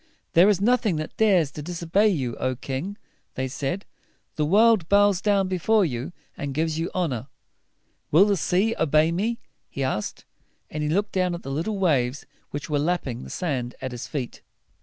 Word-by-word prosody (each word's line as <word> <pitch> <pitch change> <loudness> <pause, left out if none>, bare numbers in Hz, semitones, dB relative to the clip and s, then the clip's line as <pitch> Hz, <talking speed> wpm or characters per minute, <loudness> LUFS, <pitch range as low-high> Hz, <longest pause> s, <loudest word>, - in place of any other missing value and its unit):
"There 175 +5 +7
is 200 -3 +3
nothing 220 -3 +2
that 155 0 -5
dares 185 -9 +3
to 150 - -7
dis 170 +2 -6
o - - -5
bey 200 +6 +4
you, 135 - 0
O 130 0 -1
king!" 140 +10 -5 0.4
they 130 0 -1
said. 140 +8 -3 0.5
"The 150 -1 0
world 210 -1 +4
bows 200 -2 +4 0.3
before 190 +3 +2
you, 125 -2 -4 0.2
and 140 -4 -5
gives 160 +1 0
you 165 - -1
honor." 140 -9 -1 0.8
"Will 170 +7 +6
the 205 -1 +2
sea 190 +6 +1
obey 155 +2 +3
me?" 215 +7 -1 0.3
he 140 - -4
asked; 120 -5 -3 0.5
and 155 - -3
he 150 - 0
looked 200 +6 0
down 180 -2 0
at 170 - -9
the 135 - -5
little 170 +9 -2
waves 140 -8 +1 0.2
which 145 -1 -5
were 150 -2 0
lapping 145 -6 -1
the - - -9
sand 130 -9 -3
at 130 - -4
his 125 -1 -6
feet. 130 -5 -5
165 Hz, 185 wpm, -25 LUFS, 140-195 Hz, 0.8 s, There